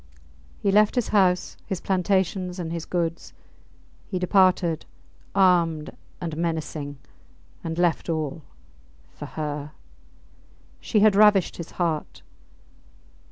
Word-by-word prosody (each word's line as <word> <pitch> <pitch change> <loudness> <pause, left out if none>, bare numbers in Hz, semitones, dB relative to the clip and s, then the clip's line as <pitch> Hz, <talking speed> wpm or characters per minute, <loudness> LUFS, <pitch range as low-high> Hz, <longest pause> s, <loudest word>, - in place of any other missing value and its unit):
He 200 - 0
left 210 +3 +4
his 245 -3 0
house, 185 -3 +2
his 190 - -3
plantations, 185 -1 0
and 170 -3 -4
his 170 -1 -5
goods! 170 -2 -2 0.7
He 185 - -3
departed, 180 -3 +3 0.5
armed 170 -5 +2 0.2
and 165 -3 -4
menacing, 160 -3 -3 0.7
and 165 0 -4
left 175 -1 +1
all 160 -1 -2 0.7
for - - -8
her! 150 -1 -5 1.1
She 215 - +1
had 210 -2 +5
ravished 210 -3 +5
his 170 - -7
heart! 165 -4 -2
175 Hz, 110 wpm, -25 LUFS, 160-190 Hz, 1.1 s, had